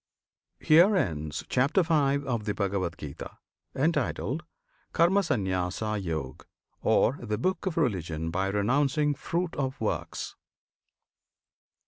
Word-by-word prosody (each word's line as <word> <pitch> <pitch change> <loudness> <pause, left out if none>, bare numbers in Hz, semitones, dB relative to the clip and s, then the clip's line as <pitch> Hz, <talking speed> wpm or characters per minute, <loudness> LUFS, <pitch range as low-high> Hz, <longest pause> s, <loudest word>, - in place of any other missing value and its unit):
HERE 175 +7 +6
ENDS 75 - -2
CHAPTER 140 +9 +2
V. 165 0 0 0.3
OF 120 -5 -2
THE 105 - -1
BHAGAVAD 95 -5 -1
GITA, 70 -2 -8 0.4
Entitled 150 0 0 0.5
"Karmasanyasayog," 95 - 0 0.4
Or 135 - +3
"The 105 -3 -2
Book 185 - -1
of 170 - -2
Religion 85 - -1
by 95 +3 0
Renouncing 135 +9 +2
Fruit 170 +4 -3
of 135 -1 -2
Works." 110 - -3
115 Hz, 100 wpm, -28 LUFS, 95-155 Hz, 0.5 s, HERE